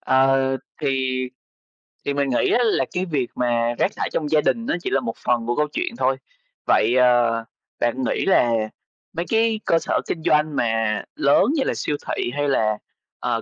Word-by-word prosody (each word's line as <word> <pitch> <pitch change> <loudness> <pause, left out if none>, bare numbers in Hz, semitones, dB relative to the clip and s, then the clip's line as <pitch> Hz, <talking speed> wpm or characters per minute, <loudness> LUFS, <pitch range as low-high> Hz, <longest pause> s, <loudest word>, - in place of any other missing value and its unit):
Ờ, 135 0 +3 0.4
thì 130 -2 0 0.9
thì 140 - 0
mình 140 -1 0
nghĩ 125 - +1
á - - +3
là 220 - +2
cái 180 +1 -1
việc 140 -8 -1
mà 120 -1 0
rác - - +2
thải - - -2
trong 150 -2 -1
gia 155 -1 +4
đình 230 +9 0
nó - - 0
chỉ - - -1
là 135 - +2
một 115 -3 -4
phần 120 -1 +1
của 120 - 0
câu 150 0 +1
chuyện 365 - -2
thôi. - - +1 0.5
Vậy, 120 - +3
ờ, 120 -2 +3 0.4
bạn 125 +2 0
nghĩ - - 0
là 120 -11 +4 0.6
mấy 170 - -3
cái 225 -1 +2
cơ 165 - +3
sở - - 0
kinh 160 -2 -3
doanh 150 -1 +2
mà 110 -2 0
lớn 140 +7 +4
như 275 - +1
là - - 0
siêu 150 - -2
thị, 120 - -2
hay 145 0 0
là, 110 -5 +1 0.4
ờ, 115 -2 -1
135 Hz, 195 wpm, -22 LUFS, 120-155 Hz, 0.9 s, gia